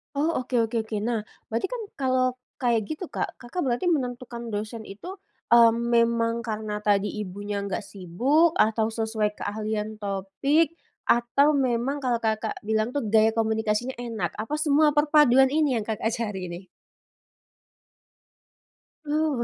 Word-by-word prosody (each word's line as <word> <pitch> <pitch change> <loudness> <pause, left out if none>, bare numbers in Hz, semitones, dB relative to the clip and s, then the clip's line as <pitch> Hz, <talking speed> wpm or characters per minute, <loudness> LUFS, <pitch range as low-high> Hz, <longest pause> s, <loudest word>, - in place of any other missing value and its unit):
Oh, 295 +3 +1
oke 250 0 -4
oke 225 - -7
oke. 220 0 -6
Nah, 225 -3 -1 0.2
berarti 230 +9 -1
kan - - -3
kalau 255 -1 +1 0.2
kayak 235 -4 +2
gitu 310 - -6
Kak, - - -3
Kakak 260 +9 -4
berarti 250 +7 0
menentukan 245 -6 -2
dosen 215 +2 -4
itu, 215 - -9 0.3
mmm, 235 -1 +7 0.2
memang 235 0 +2
karena 215 -2 -4
tadi 205 -1 +2 0.2
ibunya 200 +1 -4
nggak 200 - -2
sibuk? 235 - +1
Atau 220 0 +2
sesuai 220 -1 -1
keahlian 215 +1 -3
topik? 205 - 0 0.3
Atau 275 +5 +3
memang 265 +1 0
kalau 245 -2 +1
Kakak 220 -1 -2
bilang 220 +1 +1
tuh 270 -4 -2
gaya 220 +1 +4
komunikasinya 220 +2 0
enak? 235 -2 -4
Apa 255 +8 -3
semua 300 0 +4
perpaduan 295 -3 +5
ini 285 -3 +1
yang 210 - -6
Kakak 220 0 -1
cari, 200 -6 -4
nih? 175 +2 -7 2.4
Uh, 300 -4 0
235 Hz, 140 wpm, -26 LUFS, 215-270 Hz, 2.4 s, mmm